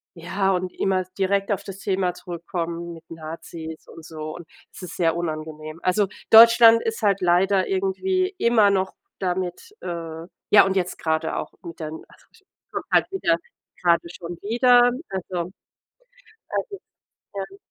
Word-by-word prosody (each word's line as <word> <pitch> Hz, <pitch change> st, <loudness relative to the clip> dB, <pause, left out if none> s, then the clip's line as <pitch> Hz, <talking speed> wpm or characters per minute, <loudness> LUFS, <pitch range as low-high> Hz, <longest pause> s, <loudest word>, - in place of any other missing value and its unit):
ja, 190 Hz, +3 st, -1 dB
und 180 Hz, 0 st, -2 dB
immer 190 Hz, -1 st, 0 dB
direkt 195 Hz, +1 st, +1 dB
auf 200 Hz, -, -1 dB
das 195 Hz, -1 st, -8 dB
Thema 190 Hz, -2 st, 0 dB
zurückkommen 170 Hz, -1 st, -5 dB
mit 165 Hz, 0 st, -14 dB
Nazis 160 Hz, 0 st, -8 dB
und 165 Hz, -, -12 dB
so 155 Hz, -1 st, -7 dB
und 175 Hz, -, -10 dB, 0.3 s
es -, -, -11 dB
ist 180 Hz, -, -8 dB
sehr 165 Hz, -2 st, +2 dB
unangenehm. 155 Hz, -1 st, -5 dB
Also, 195 Hz, +2 st, +2 dB, 0.2 s
Deutschland 230 Hz, 0 st, +9 dB
ist 225 Hz, 0 st, -3 dB
halt 200 Hz, -2 st, +2 dB
leider 185 Hz, +2 st, +3 dB
irgendwie 370 Hz, -, 0 dB
immer 230 Hz, -3 st, +5 dB
noch 190 Hz, -1 st, 0 dB, 0.3 s
damit 185 Hz, -, -3 dB
äh, 165 Hz, -2 st, -6 dB, 0.3 s
ja 205 Hz, -1 st, +8 dB
und 190 Hz, 0 st, -1 dB
jetzt 185 Hz, -1 st, -1 dB
gerade 160 Hz, 0 st, -1 dB
auch -, -, -5 dB
mit 165 Hz, -1 st, -9 dB
den 160 Hz, 0 st, -6 dB
also -, -, -22 dB
ich -, -, -24 dB, 0.3 s
kommt -, -, -4 dB
halt -, -, +4 dB
wieder 170 Hz, -, +2 dB, 0.5 s
gerade 170 Hz, -1 st, +3 dB
schon 175 Hz, 0 st, -8 dB
wieder, 245 Hz, +3 st, +5 dB, 0.2 s
also 180 Hz, -2 st, -4 dB, 1.0 s
es -, -, -3 dB
ist 400 Hz, -, -7 dB, 0.5 s
ja. 195 Hz, 0 st, -6 dB
185 Hz, 155 wpm, -23 LUFS, 165-200 Hz, 1.0 s, Deutschland